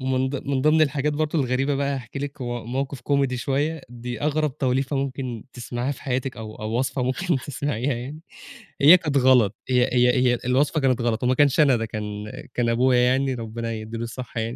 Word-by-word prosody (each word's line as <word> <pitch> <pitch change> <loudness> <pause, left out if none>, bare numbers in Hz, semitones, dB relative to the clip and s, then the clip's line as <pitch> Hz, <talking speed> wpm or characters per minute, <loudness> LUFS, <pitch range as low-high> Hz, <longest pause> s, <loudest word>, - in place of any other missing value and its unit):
ومن 130 0 0
ض 140 - -5
من 135 -2 0
ضِمن 155 +1 +4
الحاجات 145 0 +1
برضه 155 +1 -1
الغريبة 135 +2 0
بقى، 140 0 0
هاحكِي 125 +2 -7
لِك، 140 -1 -5
م - - -3 0.3
موقِف 135 0 -3
comedy 140 0 +1
شوية، 145 +5 -1
دي 120 0 -7
أغرَب 150 -1 0
توليفة 135 +2 0
ممكن 130 -4 -3
تسمعيها 120 +2 -3
في - - -12
حياتِك، 130 -1 -2
أو 110 -1 -7
أو 110 +2 -3
وصفة 130 0 -1
ممكن 145 +6 0
تسمعيها 135 -1 -2
يعني. 135 +6 -7 0.6
هي 160 +6 +9
كانت 150 -4 -1
غلَط، 125 -6 +4
هي 125 -1 +4
هي 125 0 +4 0.2
هي - - 0
الوصفة 140 +5 +2
كانت 130 -2 +2
غلَط، 115 0 -1
وما 125 +1 +3
كانش، 145 +1 +3
أنا 140 -4 +5
ده 115 - -2
كان 105 -1 -6 0.2
كان 120 -1 0
أبويا 125 +1 +3
يعني، 130 +2 +2
ربنا 115 0 -5
يدِّي 110 +1 -6
له 115 - -4
الصحة 120 0 -6
يعني. 115 +2 -3
130 Hz, 200 wpm, -24 LUFS, 120-140 Hz, 0.6 s, هي